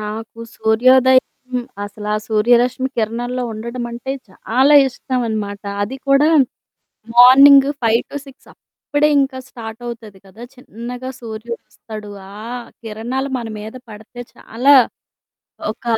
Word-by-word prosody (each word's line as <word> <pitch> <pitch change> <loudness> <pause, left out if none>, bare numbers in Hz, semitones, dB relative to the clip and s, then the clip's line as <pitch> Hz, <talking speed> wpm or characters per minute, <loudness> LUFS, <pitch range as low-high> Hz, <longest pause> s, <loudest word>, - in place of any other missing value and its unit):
నాకు 220 +2 -7 0.2
సూర్యోదయం 255 +4 +4 0.6
అసల 205 +1 -8
ఆ - - +1
సూర్యరశ్మి 240 +4 +2
కిరణాల్లో 240 +3 -2
ఉండడం 235 +3 -6
అంటే 240 +3 -5 0.2
చాలా 260 +9 +2
ఇష్టం 255 0 -4
అనమాట. 205 -2 -4 0.2
అది 240 +7 -4
కూడా 275 +3 +4 0.9
మార్నింగ్ 275 +3 +8 0.2
5-6 265 +4 -2
అప్పుడే 295 +1 -2
ఇంకా 270 -1 -2
స్టార్ట్ 225 -2 -9
అవుతది 225 -4 -9
గదా! 205 +5 -14
చిన్నగా 250 +1 -8
సూర్యుడొస్తాడు. 220 -2 -8 0.2
ఆ - - -12 0.5
కిరణాలు 235 +5 -4
మన 235 -2 -6
మీద 220 +3 -8 0.2
పడితే 220 +3 -11 0.2
చాలా 265 +5 +2 1.0
ఒక 220 - -15
235 Hz, 110 wpm, -18 LUFS, 220-260 Hz, 1.0 s, మార్నింగ్